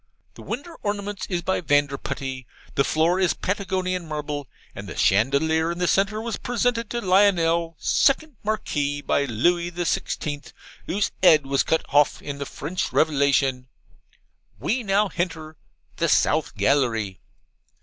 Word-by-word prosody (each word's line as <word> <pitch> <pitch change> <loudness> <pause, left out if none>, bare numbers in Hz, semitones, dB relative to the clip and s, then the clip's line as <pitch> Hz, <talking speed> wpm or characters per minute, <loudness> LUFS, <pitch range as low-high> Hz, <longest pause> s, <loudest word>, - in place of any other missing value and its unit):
The - - -13
winder 285 +9 -6
ornaments 205 -1 -3
is 175 -3 -2
by 190 - 0
Vanderputty. 140 -4 -1 0.3
The 140 - +2
floor 165 +5 +2
is 185 -2 +2
Patagonian 185 -3 -2
marble; 150 -2 -4 0.3
and - - -8
the - - -8
chandelier 150 - +2
in 170 - -5
the 180 0 0
centre 200 +4 +2
was 230 +1 -3
presented 240 -1 -1
to 240 - -3
Lionel, 170 -4 +3
second 295 +1 +2
Marquis, 145 -9 -2
by 140 0 0
Lewy 170 +9 +1
the 175 0 -4
Sixteenth, 145 -2 -3 0.3
whose 200 +2 0
'ead 160 -6 +6
was 135 0 +1
cut 160 - 0
hoff 145 0 +3
in 140 -1 -6
the 140 - -4
French 170 +6 -4
Revelation. 140 -4 +2 0.9
We 225 - 0
now 205 -1 +2
henter 165 -4 -4 0.4
THE - - +1
SOUTH - - +2
GALLERY. 115 -9 +1
165 Hz, 140 wpm, -24 LUFS, 145-195 Hz, 0.9 s, ead